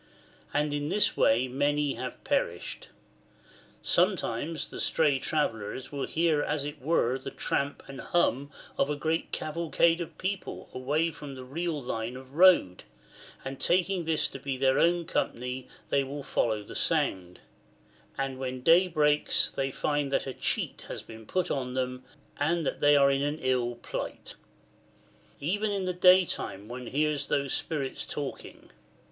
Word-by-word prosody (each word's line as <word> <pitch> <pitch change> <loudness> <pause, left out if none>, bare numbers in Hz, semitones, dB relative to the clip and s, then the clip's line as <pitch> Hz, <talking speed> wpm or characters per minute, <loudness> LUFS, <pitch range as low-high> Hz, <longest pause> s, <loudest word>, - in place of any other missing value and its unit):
And 150 0 0
in 145 0 -2
this 210 +3 +2
way 120 +4 +3
many 145 +2 +1
have - - -6
perished. 85 +1 -2 1.0
[Sometimes 150 +6 +1
the - - -7
stray 145 -4 +2
travellers 130 -5 -2
will 140 -2 -3
hear 160 -2 +2
as 145 -1 -1
it 145 -1 -6
were 130 -3 +1
the - - -6
tramp 140 +1 -2
and 135 -1 -8
hum 140 -5 +1 0.3
of 140 - +3
a 150 - 0
great 160 +3 -1
cavalcade 165 +1 +1
of 170 - -7
people 190 +1 -4
away 150 +6 0
from 145 -3 -9
the 130 - -8
real 160 +4 -3
line 120 -1 -4
of 130 0 -13
road, 170 - +5 0.6
and 135 0 -5
taking 180 0 +2
this 160 -1 +1
to 135 - -8
be 135 -1 -3
their 130 0 +3
own 170 0 +3
company 125 -3 -2 0.2
they 140 - +3
will 140 +1 -6
follow 110 -5 0
the - - -10
sound; 90 -1 -1 0.8
and 135 -1 -2
when 130 -1 -4
day 170 +6 +6
breaks 150 -3 +2
they 135 0 -1
find 145 +1 -1
that - - +1
a 135 - -4
cheat - - -2
has - - -6
been 110 -1 -12
put 185 -2 0
on 125 -2 -2
them 125 0 -2 0.4
and 165 +3 +1
that - - -2
they 145 0 +5
are 140 -1 +6
in 135 0 +1
an 145 +2 -1
ill 125 -2 0
plight."] 120 - -6 1.1
Even 205 +8 0
in 200 -2 -1
the 180 - -1
day 180 +1 +6
time 100 - -4
one 125 +1 -7
hears 150 +1 0
those 140 -2 0
spirits 140 -4 -2
talking. 145 -2 -7
140 Hz, 160 wpm, -29 LUFS, 130-160 Hz, 1.1 s, day